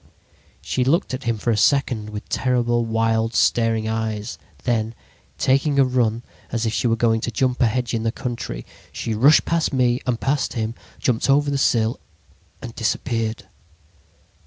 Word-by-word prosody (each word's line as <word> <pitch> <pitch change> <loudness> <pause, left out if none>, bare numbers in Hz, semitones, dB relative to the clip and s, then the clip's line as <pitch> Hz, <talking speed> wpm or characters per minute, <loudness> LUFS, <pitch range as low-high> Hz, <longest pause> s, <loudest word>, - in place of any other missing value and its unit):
"She 130 - 0
looked 140 +3 +1
at 130 +1 -5
him 115 -1 0
for 115 +3 0
a 110 - +1
second 110 -1 +2
with 105 0 -7
terrible, 120 -2 +1
wild, 115 0 0
staring 115 -2 +2
eyes. 110 -1 -3 0.2
Then, 115 -2 0 0.4
taking 140 +2 +2
a 135 - +6
run 120 -2 0 0.3
as 115 -1 -1
if 110 - -1
she 120 - +1
were 115 - +2
going 115 -1 +2
to - - -2
jump 125 +2 0
a 120 - +5
hedge 125 +2 -1
in 115 - 0
the 115 0 0
country, 115 - -5 0.3
she 115 - -3
rushed 135 +8 +5
past 165 -1 +1
me 125 -2 +2
and 120 -2 0
past 140 +1 0
him, 110 -1 -2 0.2
jumped 125 +1 0
over 145 +1 +3
the 140 - 0
sill 115 -3 +2 0.6
and 115 - -7
disappeared. 115 -1 -2
115 Hz, 170 wpm, -22 LUFS, 110-130 Hz, 0.6 s, a